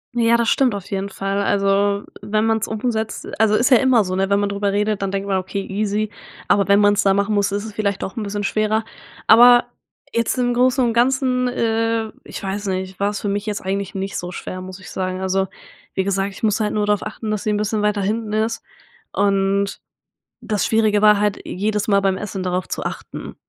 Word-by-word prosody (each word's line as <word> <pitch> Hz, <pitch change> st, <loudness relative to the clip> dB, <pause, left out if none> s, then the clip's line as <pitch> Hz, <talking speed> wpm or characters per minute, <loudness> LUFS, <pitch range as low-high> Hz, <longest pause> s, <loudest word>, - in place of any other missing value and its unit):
Ja, 235 Hz, 0 st, +4 dB
das 235 Hz, -1 st, 0 dB
stimmt 255 Hz, -6 st, +2 dB
auf 200 Hz, -1 st, -6 dB
jeden 195 Hz, 0 st, -2 dB
Fall. 195 Hz, +1 st, -2 dB
Also, 200 Hz, 0 st, +1 dB, 0.2 s
wenn 215 Hz, +1 st, 0 dB
man's 225 Hz, 0 st, +1 dB
umsetzt 220 Hz, 0 st, -3 dB
also 215 Hz, -1 st, +4 dB
ist 245 Hz, +5 st, +2 dB
ja 250 Hz, -, +8 dB
immer 250 Hz, -3 st, +4 dB
so, 185 Hz, 0 st, -3 dB
ne? 195 Hz, +1 st, 0 dB
Wenn 200 Hz, -, +3 dB
man 205 Hz, 0 st, 0 dB
darüber 200 Hz, 0 st, -1 dB
redet, 210 Hz, 0 st, 0 dB
dann 195 Hz, -, -1 dB
denkt 195 Hz, 0 st, -3 dB
man: 190 Hz, -1 st, +1 dB
„Okay 190 Hz, +2 st, -4 dB
easy“, 210 Hz, +1 st, -1 dB, 0.4 s
aber 200 Hz, -1 st, +3 dB
wenn 200 Hz, +1 st, +5 dB
man's 205 Hz, 0 st, +4 dB
da 195 Hz, -2 st, +3 dB
machen 200 Hz, +2 st, +1 dB
muss, 200 Hz, -1 st, +1 dB
ist 205 Hz, +1 st, -2 dB
es 215 Hz, -, -8 dB
vielleicht 200 Hz, -2 st, -1 dB
doch 190 Hz, -, -5 dB
'n 230 Hz, -, -3 dB
bisschen 205 Hz, 0 st, -3 dB
schwerer, 215 Hz, +2 st, 0 dB, 0.4 s
aber 240 Hz, +2 st, +7 dB, 0.5 s
jetzt 230 Hz, +2 st, 0 dB
im 245 Hz, -1 st, +1 dB
Großen 255 Hz, +1 st, +3 dB
und 230 Hz, -, 0 dB
Ganzen 250 Hz, +1 st, +2 dB
äh, 225 Hz, -2 st, 0 dB
ich -, -, -8 dB
weiß 200 Hz, +1 st, -3 dB
nicht, 190 Hz, 0 st, -3 dB
war's 205 Hz, 0 st, 0 dB
für -, -, -3 dB
mich 205 Hz, +2 st, -2 dB
jetzt 205 Hz, -, -2 dB
eigentlich 195 Hz, 0 st, -3 dB
nicht 195 Hz, 0 st, -4 dB
so 180 Hz, 0 st, -4 dB
schwer, 185 Hz, +1 st, -6 dB
muss 185 Hz, +1 st, -9 dB
ich -, -, -11 dB
sagen. 185 Hz, 0 st, -3 dB
Also 190 Hz, 0 st, 0 dB, 0.5 s
wie 190 Hz, -, +1 dB
gesagt, 195 Hz, 0 st, -1 dB
ich -, -, -13 dB
muss 215 Hz, 0 st, +2 dB
halt 210 Hz, -1 st, 0 dB
nur 210 Hz, -1 st, +1 dB
darauf 205 Hz, -1 st, +1 dB
achten, 215 Hz, 0 st, -5 dB
dass 210 Hz, -, -1 dB
sie 215 Hz, -, -1 dB
'n 210 Hz, -, +1 dB
bisschen 210 Hz, 0 st, -1 dB
weiter 210 Hz, -1 st, +1 dB
hinten 215 Hz, +2 st, -2 dB
ist 220 Hz, +1 st, -1 dB, 0.5 s
und 195 Hz, 0 st, +1 dB, 0.6 s
das 210 Hz, -3 st, -1 dB
Schwierige 215 Hz, -2 st, +2 dB
war 210 Hz, -1 st, +6 dB
halt 210 Hz, -1 st, 0 dB
jedes 210 Hz, +2 st, -2 dB
Mal 200 Hz, -1 st, +4 dB
beim 195 Hz, -1 st, +1 dB
Essen 195 Hz, -2 st, -5 dB
darauf 185 Hz, 0 st, -2 dB
zu -, -, -4 dB
achten. -, -, -7 dB
205 Hz, 220 wpm, -20 LUFS, 195-220 Hz, 0.6 s, ja